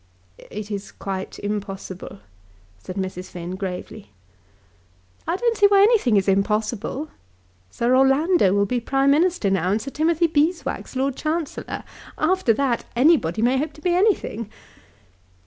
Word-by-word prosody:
"It 210 0 -7
is 200 -1 -5
quite 190 -1 -5
impossible," 195 - -6 0.6
said 180 - -8
Mrs. 185 -1 -4
Finn, 175 +1 -6
gravely. 190 +2 -6 1.2
"I 335 - +1
don't 470 +3 +1
see 410 -1 +6
why 400 -1 +5
anything 410 - +4
is 195 - +1
impossible. 215 +8 0 0.6
Sir 240 - +1
Orlando 270 - +4
will 200 +1 +2
be 245 +4 -1
Prime 270 +3 +2
Minister 320 - +2
now, 185 -2 +1
and 205 +3 +1
Sir 275 +5 -7
Timothy 325 +3 +2
Beeswax 310 -3 -1
Lord 265 0 0
Chancellor. 315 +1 -3 0.3
After 355 -5 +2
that 240 +1 0
anybody 240 - +3
may 255 +2 +3
hope 305 +3 -3
to 305 - -15
be 355 +1 +1
anything. 355 - +1
250 Hz, 140 wpm, -22 LUFS, 200-315 Hz, 1.2 s, see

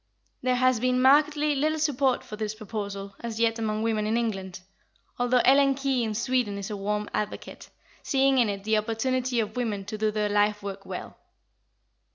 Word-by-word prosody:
There 255 0 +1
has 255 -1 +3
been 250 +1 +1
markedly 295 +3 +4
little 305 +3 0
support 275 -4 +1
for 250 -4 -8
this 215 0 -4
proposal 200 -2 -6
as 230 -1 -5
yet 230 0 +2
among 215 -1 -1
women 215 -2 0
in 225 +2 +1
England, 195 -6 -3 0.6
although 245 0 +3
Ellen 275 +1 +5
Key 270 -2 0
in 220 -2 -2
Sweden 240 -3 0
is 200 +1 -5
a - - -3
warm 210 +1 -2
advocate, 210 0 -5 0.3
seeing 270 -1 +2
in 235 -3 +3
it 200 -1 -4
the 220 0 +2
opportunity 245 +3 -1
of 215 -1 -2
women 215 -5 -2
to 215 +2 -6
do 215 0 +2
their 210 0 -1
life 205 0 +1
work 195 -1 -7
well. - - -7
225 Hz, 185 wpm, -26 LUFS, 210-255 Hz, 0.6 s, Ellen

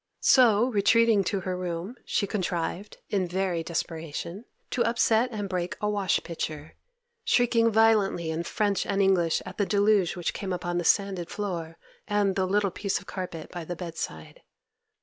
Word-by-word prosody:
So, 235 -4 +5
retreating 225 0 +4
to 200 -1 -1
her 185 0 -3
room, 180 +3 -4
she 200 - 0
contrived, 185 -1 -3
in 190 -3 +1
very 180 -1 -1
desperation, 165 +4 -5 0.3
to 245 - +1
upset 230 +1 +2
and 205 -3 -3
break 180 -2 -3
a 210 - -1
wash 205 -3 +1
pitcher, 155 -2 -5 0.5
shrieking 240 - +3
violently 210 -7 +3
in 160 +1 -2
French 200 +3 0
and 200 - 0
English 185 -4 +2
at 185 +2 -9
the 205 - +3
deluge 205 -3 +3
which 175 - -2
came 190 -2 -4
upon 175 0 -2
the - - -2
sanded 190 -1 +1
floor 170 -6 -4 0.3
and 205 -2 +1
the 190 -1 +1
little 200 0 +1
piece 200 +1 -1
of - - -9
carpet 180 -5 -6
by 175 -1 -6
the 175 +2 -5
bedside. 165 - -7
190 Hz, 165 wpm, -27 LUFS, 175-210 Hz, 0.5 s, So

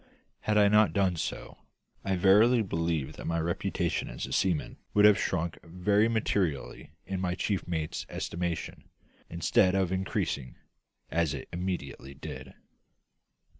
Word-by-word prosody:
Had 105 0 0
I 105 -1 +6
not 105 +1 +4
done 95 -3 +2
so, 80 - -5 0.4
I 95 -1 0
verily 105 +6 +5
believe 80 -5 -2
that - - -7
my 85 0 0
reputation 85 +1 -1
as - - -5
a - - -9
seaman 90 -6 0 0.2
would 105 0 +6
have 105 -1 +7
shrunk 85 -2 -1
very 100 +5 +2
materially 100 -10 -1 0.2
in 95 -1 -3
my 90 -1 -1
chief 95 -1 -2
mate's 80 -3 -3
estimation, 85 -1 -4 0.4
instead 85 +2 +2
of 95 -2 +1
increasing, 95 -8 -2 0.6
as 80 -3 +1
it 70 - -7
immediately 85 -7 -4
did. - - -8
90 Hz, 135 wpm, -29 LUFS, 80-100 Hz, 0.6 s, have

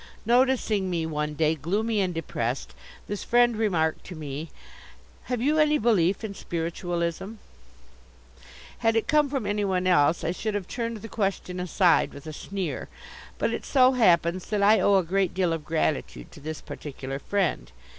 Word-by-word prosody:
Noticing 235 -5 +2
me 170 -2 -1
one 150 -1 -3
day 155 0 +2
gloomy 205 +8 -1
and 185 -2 0
depressed, 135 -7 -3 0.3
this 205 0 -4
Friend 240 -1 +3
remarked 175 -8 0
to 180 - -8
me: 150 +1 -6 0.8
"Have 245 -2 -2
you 305 +3 +2
any 300 0 +4
belief 200 - +2
in 215 -2 -4
Spiritualism?" 170 +2 -3 1.5
Had 225 -1 +2
it 225 - +1
come 300 -2 +3
from 270 -5 -2
anyone 200 -3 0
else, 170 -3 +3
I 170 - 0
should 210 +4 -3
have 195 -3 -3
turned 230 -2 -3
the - - -5
question 195 -4 -2
aside 180 -1 +2
with 140 - -11
a 155 - -6
sneer. 190 +1 -4 0.5
But - - 0
it - - -4
so 260 -2 +4
happens 180 -7 +3
that 205 -1 0
I 215 +2 +6
owe 200 - +4
a 190 - +4
great 190 +1 0
deal 180 -3 +1
of 165 -2 -4
gratitude 155 - -2
to - - -13
this 155 +2 -6
particular 135 -2 -7
Friend. 190 - -1
185 Hz, 165 wpm, -26 LUFS, 165-220 Hz, 1.5 s, I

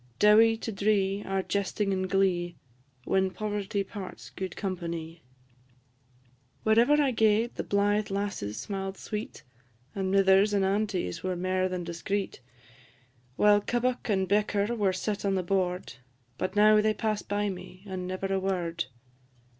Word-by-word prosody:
Dowie 220 - +6
to 225 - -5
dree 200 -1 +1
are 195 0 0
jesting 200 0 -1
and 185 0 -1
glee, 180 -3 +1 0.5
When 190 0 +2
poverty 205 0 -2
parts 195 -1 -9
gude 190 0 -5
companie. 170 -4 -4 1.4
Wherever 230 +6 +4
I 280 -3 +3
gaed 220 0 +2
the - - -4
blythe 205 +1 +1
lasses 195 - -3
smiled 195 -1 -4
sweet, 210 -7 -6 0.5
And 190 -1 -2
mithers 195 +1 +4
and 195 -1 +2
aunties 195 - -1
were 185 -1 -2
mair 185 +1 0
than 180 -1 -3
discreet, 175 +3 -3 1.0
While 205 +3 +5
kebbuck 245 +3 -1
and 190 -2 +1
bicker 205 +2 +1
were 205 -4 +2
set 200 +2 -3
on 195 -1 +1
the 185 - 0
board; 180 0 -1 0.5
But 185 +2 -2
now 215 +1 +6
they 215 0 +1
pass 215 0 -1
by 205 0 -1
me, 185 0 -9
and 185 -2 -5
never 185 +1 -4
a 190 - +1
word. 175 -3 -2
195 Hz, 145 wpm, -28 LUFS, 185-210 Hz, 1.4 s, Dowie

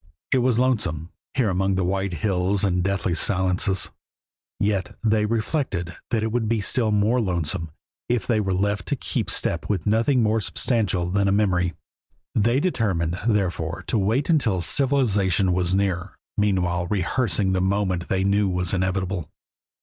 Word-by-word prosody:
It 130 - +4
was 125 -2 +2
lonesome, 95 - 0 0.2
here 120 -6 +2
among 95 +1 +1
the 95 - 0
white 95 +2 -1
hills 95 +3 0
and 95 -3 +2
the - - +1
deathly 95 -2 -1
silences, 95 +2 +1 0.7
yet 100 -3 -1
they 110 -1 +2
reflected 110 - -2
that 110 -2 0
it 110 - -1
would 115 -2 0
be 115 -1 +1
still 110 +2 +1
more 105 +4 +2
lonesome 85 -3 -2 0.4
if 120 -4 0
they 115 -3 +1
were 95 -3 0
left 100 -1 -1
to - - 0
keep - - -3
step 85 - 0
with 95 -6 -1
nothing 115 +4 +2
more 110 +1 +2
substantial 105 -6 0
than 100 +1 +2
a - - +3
memory. 90 -4 +1 0.6
They 120 +5 +2
determined, 95 - 0
therefore, 90 -5 -1
to 115 - +1
wait 110 +9 +1
until 115 - +2
civilization 100 -8 +1
was 90 0 +1
nearer, 95 -2 -1 0.2
meanwhile 90 -4 +1
rehearsing 100 +1 0
the 95 - +1
moment 95 -2 0
they 95 0 +1
knew 100 0 +2
was 90 0 -1
inevitable. 95 -3 -1
100 Hz, 160 wpm, -23 LUFS, 90-110 Hz, 0.7 s, It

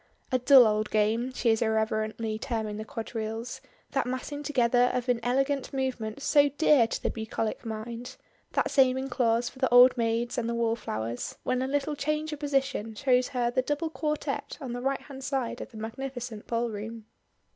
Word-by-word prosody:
"A 255 - +2
dull 255 0 +8
old 215 0 +1
game," 220 +4 +1
she 245 -2 +1
is 225 - +1
irreverently 220 0 0
terming 220 -4 -3
the 215 - -4
quadrilles 225 +3 -5 0.3
that 270 -2 0
massing 260 +3 -4
together 250 -4 +3
of 250 0 -1
inelegant 255 +3 0
movements 260 -2 -3
so 290 -1 +5
dear 285 -4 +4
to - - -4
the - - +1
bucolic 220 0 -3
mind 230 +3 -6 0.4
that - - +1
saving 265 -1 +3
clause 240 -2 +1
for 260 - -9
the 260 - +2
old 245 +1 +8
maids 230 +1 0
and 230 -1 -2
the 235 - -1
wall 230 -1 +1
flowers; 115 - -4
when 255 0 0
a 260 - -1
little 285 +2 0
change 305 +1 -2
of 295 - -6
position 270 -6 -1
shows 255 -1 +2
her 245 -3 0
the 255 - +2
double 295 +4 -2
quartette 300 -1 -3
on 260 -5 -5
the 245 - -4
right 270 +1 -1
hand 270 -2 -10
side 260 -3 -2
of - - -7
the 230 - -12
magnificent 235 0 -6
ballroom. 230 -1 -3
245 Hz, 180 wpm, -28 LUFS, 225-270 Hz, 0.4 s, dull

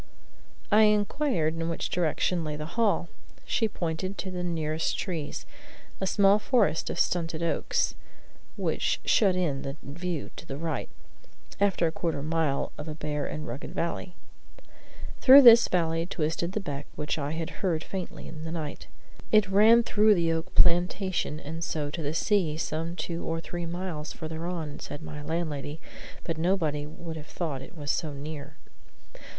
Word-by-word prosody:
I 215 +1 +7
inquired 210 - +2
in 165 0 -2
which 165 - -3
direction 175 0 +1
lay 150 -1 -3
the 150 0 -5
hall. 215 -6 +2 0.4
She 225 - +1
pointed 185 0 -3
to 190 - -4
the 180 -1 -3
nearest 160 -2 -1
trees, 165 -7 -4 0.5
a 190 - -1
small 200 +1 +5
forest 210 - +2
of - - -3
stunted 165 -2 0
oaks, 165 - 0 0.6
which - - 0
shut 195 -4 +4
in 155 -7 0
the 135 +1 -5
view 170 +2 -4
to - - -10
the 135 - -5
right, 160 -3 -3 0.7
after 190 -5 +2
quarter 165 -1 -2
of 140 - -4
a - - -4
mile 160 -4 0
of 150 - -6
a 155 - -5
bare 150 -2 -3
and 155 0 -5
rugged 125 +5 -6
valley. 170 +1 -3 1.0
Through 275 +1 +10
this 235 -1 +9
valley 165 -1 +1
twisted 170 0 -1
the 215 - 0
beck 145 -7 -5
which 150 +1 -2
I 145 +1 -2
had 160 0 -3
heard 165 -5 0
faintly 190 -2 -6
in 155 - -8
the 160 - -5
night. 155 -3 -5 0.4
It 215 -3 +4
ran 220 +4 +7
through 215 -1 +4
the 170 -2 +2
oak 160 0 -4
plantation 175 -2 +2
and 165 +2 -6
so 150 -3 -2
to 165 - -4
the 150 +1 -2
sea, 175 -6 +2
some 165 +1 -3
two 170 0 -4
or 165 0 -2
three 175 +1 -5
miles 170 -3 -4
further 160 +1 -5
on, 160 -5 -4
said 145 - -7
my 150 -1 -7
landlady; 155 -1 -3 0.4
but 165 -2 -3
nobody 160 -5 +1
would 160 +1 -7
have 155 0 -9
thought 150 -7 -3
it 175 - -11
was 145 -1 -1
so 155 -3 -2
near. 145 0 -7
165 Hz, 170 wpm, -28 LUFS, 155-185 Hz, 1.0 s, Through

